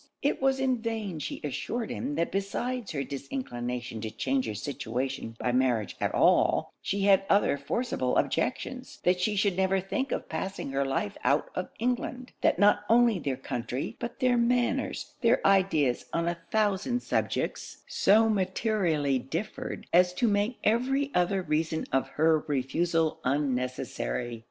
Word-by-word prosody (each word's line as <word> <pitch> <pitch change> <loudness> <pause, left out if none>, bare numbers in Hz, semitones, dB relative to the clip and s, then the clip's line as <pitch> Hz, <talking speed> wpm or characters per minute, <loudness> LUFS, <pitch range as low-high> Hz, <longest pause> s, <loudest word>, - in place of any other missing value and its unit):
It 285 - +1
was 270 0 +2
in 260 -2 +1
vain 220 -7 -3
she - - -4
assured 225 - -3
him 145 - -3
that 170 +2 0
besides 225 +4 -2
her 140 -4 -2
disinclination 125 - -5
to 110 - -3
change 130 +2 -1
her 110 - -3
situation 130 0 -4
by 125 - -1
marriage 125 -4 +1
at - - +1
all, - - +3
she 200 +1 -2
had 195 -1 +5
other 200 -7 +4
forcible 140 - -1
objections; - - -1
that 180 0 +3
she 210 +3 +1
should 200 -2 +2
never 190 +1 +2
think 265 +9 -2
of - - -2
passing 165 -2 -4
her 135 0 +1
life 135 -6 -2
out - - +2
of - - -3
England; 250 +2 -2
that - - +3
not 205 +2 +4
only 230 -3 +5
their 135 -5 -2
country, 125 0 -4
but 235 0 -5
their 250 -1 +3
manners, 245 +3 0
their - - +4
ideas 170 -10 +3
on 170 0 0
a 170 0 -2
thousand 215 +3 +1
subjects, - - -2
so 220 +3 +4
materially 185 - +1
differed, 165 - -5
as 180 +1 +5
to 240 - +2
make 210 +3 +1
every 270 +5 +1
other 185 +2 +1
reason 160 0 -1
of 135 - +2
her 160 +1 +3
refusal 160 +4 0
unnecessary. 125 - -2
180 Hz, 155 wpm, -28 LUFS, 135-220 Hz, -, had